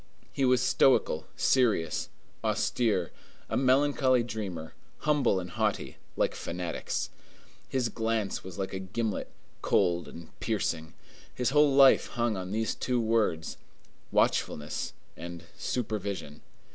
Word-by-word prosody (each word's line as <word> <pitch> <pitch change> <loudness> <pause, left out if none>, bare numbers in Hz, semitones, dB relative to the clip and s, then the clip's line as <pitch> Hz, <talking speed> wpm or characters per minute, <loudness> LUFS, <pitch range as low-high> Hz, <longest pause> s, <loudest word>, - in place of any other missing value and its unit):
He 135 - +1
was 125 -1 +4
stoical, 125 - +3
serious, 110 - +2 0.3
austere; 105 -8 +1 0.4
a - - +1
melancholy 130 -1 +3
dreamer, 100 -8 -5 0.3
humble 145 -10 +2
and 90 -1 -7
haughty, - - -1 0.2
like - - +2
fanatics. 90 0 -3 0.6
His 130 -3 +1
glance 110 -2 -1
was 95 0 -9
like 95 -1 -3
a 95 - -3
gimlet, 105 +3 -3 0.3
cold 85 -1 +2
and 85 -1 -10
piercing. 85 -7 -2 0.4
His 125 +1 0
whole 150 0 +5
life 135 -1 +7
hung 120 -2 0
on 90 -1 -5
these 110 +1 0
two 125 -1 -1
words: 110 -8 0 0.5
watchfulness 75 0 0 0.2
and 85 0 -8
supervision. 100 - -3
110 Hz, 120 wpm, -29 LUFS, 90-125 Hz, 0.6 s, life